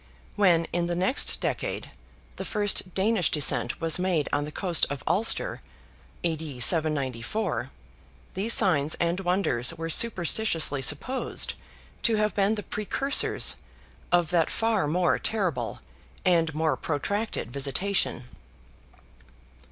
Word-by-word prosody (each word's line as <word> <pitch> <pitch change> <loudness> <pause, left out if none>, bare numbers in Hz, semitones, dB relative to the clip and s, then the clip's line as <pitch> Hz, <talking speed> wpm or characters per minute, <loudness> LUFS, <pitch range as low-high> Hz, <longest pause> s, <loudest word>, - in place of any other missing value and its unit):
When, 175 -5 +3
in 175 0 0
the 175 - -2
next 190 +10 +1
decade, - - -3 0.5
the - - -4
first 205 -4 -1
Danish 195 -3 +2
descent 130 -5 +1
was 165 +1 +1
made 180 -5 0
on 145 0 0
the 150 - -8
coast 175 -1 +1
of 145 -1 -6
Ulster 195 +7 0 0.6
(A.D. 160 -5 -3
794), 150 - +1 0.7
these 205 +5 0
signs 160 -10 +4
and 170 +2 -1
wonders 175 -8 +1
were 165 0 -3
superstitiously 175 -7 +3
supposed 150 - 0 0.5
to 230 - +2
have 210 0 0
been 205 +2 +1
the 210 - -5
precursors 270 +7 0 0.5
of 175 -1 +2
that 170 -2 +2
far 225 -7 0
more 175 +3 +1
terrible 170 - -2 0.5
and 165 -3 +3
more 160 0 +1
protracted 185 - -3
visitation. 140 +4 -1
175 Hz, 120 wpm, -26 LUFS, 150-200 Hz, 0.7 s, signs